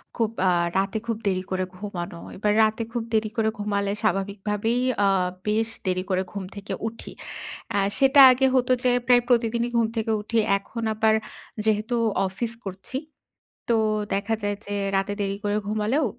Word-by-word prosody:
খুব 225 -2 +1 0.2
আ - - +5 0.3
রাতে 195 +2 0
খুব 230 -2 -1
দেরি 185 -1 0
করে 185 0 0
ঘুমানো। 175 -4 -6 0.2
এবার 210 +1 +1
রাতে 220 +1 +1
খুব 235 -2 -1
দেরি 220 0 +2
করে 220 -1 +2
ঘুমালে 200 -1 -1
স্বাভাবিকভাবেই 210 +3 0 0.2
আ - - +4 0.4
বেশ 220 +2 +1 0.2
দেরি 185 0 0
করে 185 0 +1
ঘুম 200 -2 -5
থেকে 200 0 -6
উঠি। 225 +1 -8 0.6
আ - - +3 0.2
সেটা 275 +1 +6
আগে 260 +2 +3
হত 250 -1 +2
যে 250 - +4 0.2
প্রায় 245 -1 +6
প্রতিদিনই 235 -1 +2
ঘুম 230 -1 +3
থেকে 225 0 0
উঠি। 230 +2 -2 0.2
এখন 230 +4 -7
আবার 220 0 +3 0.5
যেহেতু 215 +2 +1 0.3
অফিস 225 +5 -3
করছি। 195 +7 -5 0.7
তো 235 - +4 0.4
দেখা 200 +3 0
যায় 205 0 -1
যে 205 - -3 0.2
রাতে 195 +1 0
দেরি 195 0 -1
করে 205 0 +1
ঘুমালেও 215 +8 +1
215 Hz, 165 wpm, -25 LUFS, 200-230 Hz, 0.7 s, সেটা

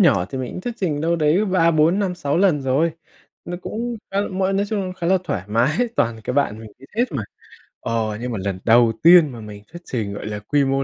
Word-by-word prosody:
nhỏ 115 - +4
thì 135 - -4
mình 130 -1 -4
cũng - - -6
thuyết 240 +4 -4
trình 165 -9 -1
đâu 165 +2 +1
đấy 160 +6 +2
3-4-5-6 175 -2 +2
lần 180 -6 +3
rồi, 140 +6 +1 0.5
nó 175 - -5
cũng 235 +2 -4
khá 195 +1 0
là 205 - -2
muỗi, 190 0 -1
nói 200 +1 0
chung 200 -3 -2
khá 170 -2 -3
là 190 +1 +4
thoải 100 - -2
mái, 115 +7 +2 0.2
toàn 115 -1 0
cái 125 - -2
bạn 140 -7 +1
mình 110 -2 -11
biết 135 - -15
hết 240 - +3
mà. 135 - -2 0.6
Ờ, 110 -2 -2
nhưng 125 0 -3
mà 110 - -3
lần 95 -2 -2
đầu 115 0 +5
tiên 170 -2 +8
mà 120 - -9
mình 105 -1 -10
thuyết 175 +1 -10
trình, 110 -5 -3
gọi 100 - -7
là, 105 0 -4
quy 140 +8 +1
mô 135 0 +1
150 Hz, 240 wpm, -21 LUFS, 115-185 Hz, 0.6 s, tiên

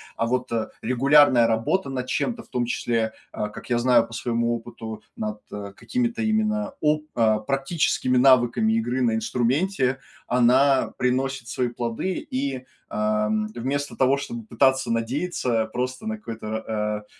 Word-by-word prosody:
а 115 - 0
вот. 125 +1 -1
Э, 115 -2 -1 0.2
регулярная 130 -1 +5
работа 115 +10 0
над 130 -2 -3
чем-то, 225 - -2
в - - -23
том 125 -1 -1
числе, 115 -2 -1 0.2
а, 105 - -3
как 105 - -11
я 120 - +3
знаю, 125 0 +4
по - - -13
своему 115 +1 0
опыту, 115 -2 -8
над, 105 -1 -4
э, 100 -1 -7
какими-то 235 - -2
именно 215 -1 0
оп 150 0 +2
а 110 -2 +3
практическими 135 +1 0
навыками 130 - +4
игры 130 - 0
на 115 -3 +2
инструменте, 130 - 0 0.3
она 130 +3 +3
приносит 130 0 0
свои 125 - 0
плоды. 120 +10 -3
И, 130 -1 -2 0.2
а, 105 0 0
м, 105 0 0
вместо 140 +4 -2
того, 135 +1 +3
чтобы 230 +9 -6
пытаться 130 - +2
надеяться, 120 0 0
просто 130 - -3
на 220 0 -2
какое-то 115 - -8
р 110 +1 -3
а, 105 -1 -2
125 Hz, 155 wpm, -24 LUFS, 115-140 Hz, 0.3 s, регулярная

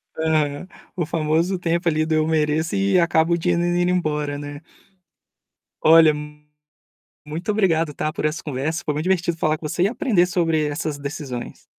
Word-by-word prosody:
Aham, 155 0 0 0.3
o 175 -4 -1
famoso 165 +3 0
tempo 170 0 -1
ali 155 -1 +2
do 160 - 0
eu 155 0 +2
mereço 160 +2 0
e 195 -1 +2
acabo 170 0 +2
o 170 - +2
dinheiro 170 0 0
indo 175 0 +1
embora, 150 -5 -1
né. 145 0 -8 1.2
Olha, 160 0 +7 1.1
muito 160 +7 -3
obrigado 165 -7 +1
está 155 +1 -3
por - - -5
essa 155 +2 -1
conversa, 150 +3 -3
foi 150 - 0
muito 150 +2 -2
divertido 175 -2 0
falar 155 -1 +1
com 155 - -6
você 175 - 0
e - - +4
aprender 220 - +2
sobre 165 -3 0
essas 150 0 -3
decisões. 140 -4 -6
160 Hz, 170 wpm, -22 LUFS, 150-175 Hz, 1.2 s, Olha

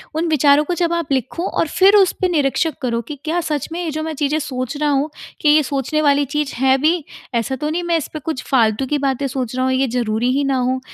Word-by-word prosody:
उन 325 +2 0
विचारों 295 -1 +4
को 355 - -1
जब 340 0 0
आप 335 -4 -2
लिखो 265 +6 -1
और - - -1
फ़िर 385 +6 +4
उस 390 -3 +5
पे 370 - +3
निरीक्षक 310 -1 +1
करो 235 -2 -1
कि 300 - -4
क्या 335 +3 0
सच 300 -4 -2
में 340 - -4
ये 330 - -2
जो 310 +1 -3
मैं 320 0 -3
चीज़ें 295 +1 0
सोच 255 -2 -4
रहा 300 0 0
हूँ 285 +2 +1 0.3
कि 300 - +3
ये 305 +1 +5
सोचने 280 +2 -1
वाली 285 -1 +3
चीज़ 295 +1 -2
है 265 +1 +3
भी, 315 +4 +1 0.3
ऐसा 235 +3 0
तो 300 +4 -3
नहीं 345 +3 -2
मैं 340 -1 +1
इस 305 - -4
पे 310 - -4
कुछ 315 -2 -4
फ़ालतू 230 -1 +2
की 295 +3 0
बातें 275 -1 -1
सोच 255 -2 -4
रहा 255 0 0
हूँ, 260 - +1
ये 265 +1 +1
ज़रूरी 235 0 -1
ही 280 +2 +1
ना 275 -1 +1
हो। 255 +1 0
285 Hz, 265 wpm, -19 LUFS, 260-315 Hz, 0.3 s, उस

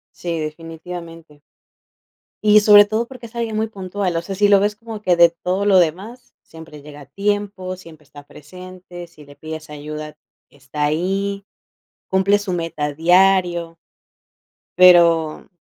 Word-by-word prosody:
Sí, 170 -2 -4
definitivamente 165 0 -9 1.0
Y 210 0 +6
sobre 205 0 +7
todo 220 +3 -2
porque 250 -3 -11
es 225 - -18
alguien 230 -2 -3
muy 220 - 0
puntual, 195 -3 -4
o 165 - -2
sea, 195 +2 -7
si 205 +1 +3
lo 200 -1 +5
ves 210 +1 -1
como 225 -1 -10
que 180 -4 +2
de 170 0 +7
todo 180 +4 -3
lo 195 -2 +5
demás, 190 +9 -3
siempre 160 -2 -14
llega 145 0 -12
a 140 - -14
tiempo, 200 0 -3
siempre 160 -4 -16
está 145 0 -15
presente, 180 +2 -12
si 155 -3 -17
le 145 - -16
pides 155 0 -9
ayuda, 150 +1 -8 0.3
está 145 +1 -6
ahí, 195 +6 -2 0.6
cumple 190 +2 +2
su 200 -3 -5
meta 165 -3 -3
a 150 - -4
diario 175 0 +2 1.0
pero, 170 -3 +4
180 Hz, 155 wpm, -19 LUFS, 160-200 Hz, 1.0 s, sobre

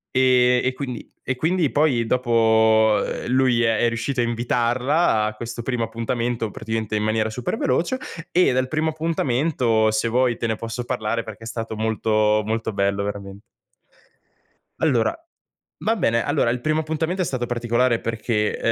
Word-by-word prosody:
Ehm, 125 -1 +4
e 130 - +1
quindi 130 -3 -6
e 130 - -2
quindi 160 +3 +1
poi 140 -6 +2
dopo, 110 -3 +3
ehm, - - -5
lui 125 -1 +3
è 115 -2 +2
è 120 - +2
riuscito 115 +3 -2
a - - +3
invitarla 120 +3 +1
a 110 - -2
questo 120 +2 -6
primo 120 -1 -2
appuntamento 115 0 -2
praticamente 110 -1 -3
in 105 - 0
maniera 110 0 0
super 120 +2 -3
veloce, 170 - 0 0.3
e 180 +1 +4
del 130 +1 +1
primo 155 +3 0
appuntamento 135 -7 +1
se 110 +2 0
vuoi 125 +1 +2
te 115 - -2
ne 110 - 0
posso 115 +2 -5
parlare, 115 -2 -2
perché 110 0 -10
è - - -7
stato 115 -1 -5
molto, 110 -1 +1
molto 110 0 -2
bello 100 0 0
veramen 100 -1 -6 1.4
Allora 125 -8 +2 0.7
va 225 +2 +2
bene. 115 - +1
Allora - - +1
il 120 +1 -2
primo 155 +3 +1
appuntamento 160 +4 -2
è - - +1
stato 130 -5 -2
particolare, 120 0 +1
perché, 110 -1 -1
120 Hz, 165 wpm, -22 LUFS, 110-130 Hz, 1.4 s, Ehm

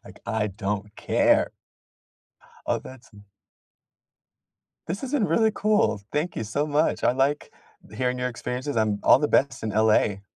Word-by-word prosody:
Like, - - -14
I 110 -1 -1
don't 100 +1 -4
care. - - +2 1.2
Oh, - - +1
that's 130 -1 -13
in 100 0 -16 1.6
This 185 +4 -3
has 265 +1 -5
been 240 -9 +2
really 220 -1 +2
cool. 155 - +1
Thank 155 +4 -1
you - - -2
so 140 +8 -1
much. 150 +2 0
I - - +4
like 135 +3 0 0.3
th - - -14
hearing 125 0 0
your 125 0 -1
experiences. 125 +2 -5
I'm 105 -2 +1
all - - +7
the 150 - +1
best 140 - +1
in 110 - -2
LA. 105 -2 +2
125 Hz, 160 wpm, -25 LUFS, 105-150 Hz, 1.6 s, all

